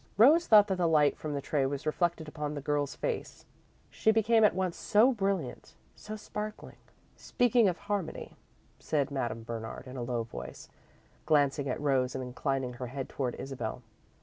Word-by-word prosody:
Rose 300 +10 +6
thought 210 -2 +8
that 190 -3 -2
the 175 - +3
light 150 -3 +4
from 150 -2 -5
the 140 - -3
tray 145 -3 0
was 140 +1 -4
reflected 165 0 0
upon 150 -1 -4
the - - -3
girl's 145 -1 -1
face, - - -4 0.5
she - - +1
became 220 +1 +4
at 210 - +5
once 185 -2 -1
so 225 +5 +4
brilliant, 195 - -3 0.2
so 215 - -8
sparkling. 210 0 -7 0.4
"Speaking 245 -2 +2
of 175 - -3
harmony 205 -5 -4 0.2
" - - -35
said 145 -3 +1
Madame 120 -4 -3
Bernard, 115 +2 -6
in 130 0 -8
a - - -4
low 120 -1 -2
tone, 60 - -7 0.8
glancing 140 -2 +2
at - - -2
Rose 135 -3 +1
and 130 - -3
inclining 130 0 -2
her 125 +1 -6
head 135 +2 -5
toward 130 -3 -3
Isabel. 125 -3 -5
150 Hz, 175 wpm, -30 LUFS, 130-205 Hz, 0.8 s, thought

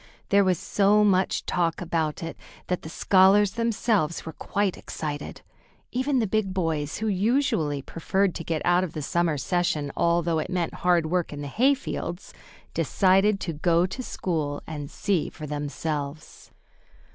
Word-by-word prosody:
There 200 0 +5
was 185 -2 +2
so 205 +4 +3
much 190 -2 +2
talk 170 -2 0
about 165 -3 -2
it 165 - -5 0.3
that 180 -1 0
the 160 - -8
scholars 190 +3 +4
themselves 225 -7 0
were 160 - -6
quite 200 +2 -1
excited. 150 -2 -6 0.5
Even 260 +2 0
the 235 - +2
big 195 -2 -1
boys, 160 -5 -1
who 220 - -2
usually 195 - +1
preferred 190 +4 0
to - - -6
get 160 -1 -2
out 175 +1 +4
of 180 - -4
the 155 - -4
summer 170 0 +1
session 155 -2 0
although 170 -1 +2
it 155 - -3
meant 180 -3 -1
hard 175 -2 +3
work 175 +2 -1
in 145 -1 -6
the 145 - -5
hayfields, 245 - -1 0.4
decided 195 +1 +3
to 165 - -3
go 170 +3 +2
to 190 +8 -5
school 155 -11 -3
and 150 -3 -6
see 190 -7 -1
for 155 - -9
themselves. 145 0 -5
175 Hz, 160 wpm, -26 LUFS, 155-195 Hz, 0.5 s, There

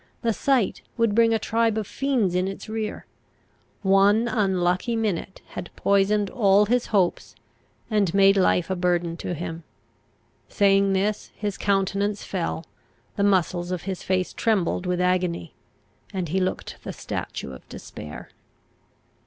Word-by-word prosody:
The 230 -1 +2
sight 260 -4 +1 0.2
would 230 -3 +2
bring 230 +1 +4
a 225 - +3
tribe 225 0 +1
of 215 - -1
fiends 250 -7 0
in 180 +1 +1
its 195 - -6
rear. 220 0 -4 0.8
One 200 +4 +4
unlucky 190 -1 +1
minute 205 -4 -2
had 175 - -7
poisoned 200 0 +2
all 205 -4 +4
his 245 +3 +1
hopes, 180 - 0 0.5
and 210 -5 +1
made 195 +1 +5
life 185 -2 +2
a - - +1
burden 175 -2 0
to 175 - -4
him. 165 0 -5 0.9
Saying 195 -1 +3
this, 200 +2 -1
his 205 -2 -3
countenance 200 +1 0
fell, 170 -3 -3 0.5
the - - -2
muscles 180 -3 +2
of 180 -2 -3
his 190 -2 -4
face 185 -1 -1
trembled 195 -5 0
with 180 0 0
agony, 180 -2 0 0.6
and 185 -5 -3
he 190 +4 +1
looked 185 0 -3
the - - -5
statue 65 - -5
of 65 - -12
despair. 75 0 -9
195 Hz, 145 wpm, -24 LUFS, 180-210 Hz, 0.9 s, made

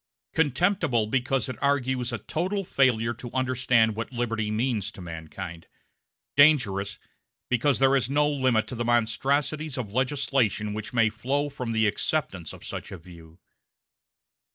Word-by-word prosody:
Contemptible, 160 - +2
because 130 +2 0
it 130 - -7
argues 130 -3 +1
a 120 - -2
total 185 - -2
failure 120 -6 +2
to 120 +1 -9
understand 125 -4 +2
what 115 +3 -4
liberty 115 -3 -2
means 110 -2 -1
to - - -14
mankind; 85 0 -8 0.7
dangerous, 105 -10 +4 0.5
because 130 +3 +2
there 135 0 +4
is 130 -2 +1
no 145 +1 +3
limit 130 -6 +2
to 110 - -8
the 120 -1 -2
monstrosities 135 +6 0
of 110 -6 -5
legislation 130 -5 0
which 110 0 -5
may 115 -3 +3
flow 140 +6 -1
from 125 -4 -5
the 110 -1 +2
acceptance 100 - -1
of - - -12
such - - -6
a 95 - -6
view. 85 -1 -15
120 Hz, 145 wpm, -26 LUFS, 110-135 Hz, 0.7 s, dangerous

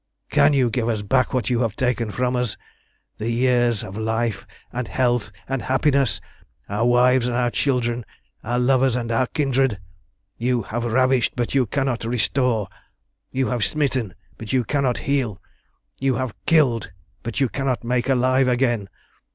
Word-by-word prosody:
"Can - - +5
you 130 -4 +2
give 115 0 0
us 110 -3 -1
back 130 +5 +2
what 125 -4 -1
you 120 - +2
have 115 -4 0
taken 125 -3 0
from 125 +4 -1
us 125 -4 -1 0.6
the 110 +2 -2
years 120 -2 +2
of 95 - -8
life 110 -1 -2 0.3
and 125 -1 -3
health 120 0 0 0.2
and 135 -1 -2
happiness, 135 -3 +1 0.5
our 105 +4 0
wives 125 0 +4
and 120 - -1
our 120 -1 +1
children, 120 -3 0 0.4
our 120 +2 -1
lovers 130 0 +3
and 120 -2 -2
our 120 +2 +2
kindred? 135 -6 +1 0.6
You 120 -1 +1
have 120 +4 -3
ravished, 130 +1 +2
but 120 -1 -2
you 130 -3 +2
cannot 135 0 -1
restore. 115 -1 0 0.6
You 130 0 -1
have 120 -3 0
smitten, 130 - 0 0.2
but 110 - -6
you 130 -2 +2
cannot 135 -1 0
heal. 130 -8 -1 0.6
You 135 -1 +1
have 130 0 -2
killed, 130 - +3 0.3
but 115 +1 -4
you 135 - +3
cannot 130 -2 -2
make 125 +2 0
alive 130 0 +3
again. 120 -5 +1
125 Hz, 160 wpm, -22 LUFS, 115-130 Hz, 0.6 s, Can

